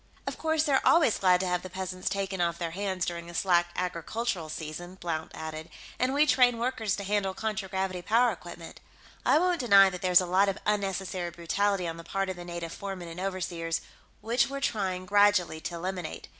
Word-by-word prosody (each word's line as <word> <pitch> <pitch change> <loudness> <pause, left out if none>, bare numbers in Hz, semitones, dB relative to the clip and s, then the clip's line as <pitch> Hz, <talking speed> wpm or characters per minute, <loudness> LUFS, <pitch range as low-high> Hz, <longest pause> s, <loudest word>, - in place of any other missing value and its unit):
"Of - - -3
course, 315 -1 +1
they're 280 -4 +3
always 320 -10 +4
glad 180 -1 +4
to 190 - -1
have 180 0 0
the 185 - -8
peasants 185 0 -4
taken 195 -2 -2
off 170 -1 0
their 170 -1 -3
hands 190 -1 -2
during 170 -1 -5
a 175 - -9
slack 175 -2 +3
agricultural 180 +1 -2
season," 160 +4 -6
Blount 165 -3 -4
added, 160 0 -6 0.3
"and 255 +1 +2
we 290 +2 +4
train 250 -5 +4
workers 230 -3 -1
to 200 - -5
handle 195 -1 0
contragravity 190 -4 -2
power 230 +6 +3
equipment. 175 -3 -10 0.5
I - - +6
won't 355 +1 +2
deny 200 -6 +6
that 180 - -7
there's 180 -1 +5
a 185 - 0
lot 190 +3 +3
of 195 - -2
unnecessary 195 -3 -1
brutality 180 +2 0
on 165 0 -4
the 165 - -9
part 195 +2 -2
of 185 - -3
the 175 - -8
native 170 -1 -5
foremen 190 -4 -6
and 165 +2 -8
overseers, 175 -3 -2 0.4
which 235 +2 +2
we're 275 0 -4
trying, 190 -8 -1
gradually, 205 -5 +3
to 170 - -5
eliminate. 180 -1 -5
185 Hz, 200 wpm, -28 LUFS, 175-205 Hz, 0.5 s, I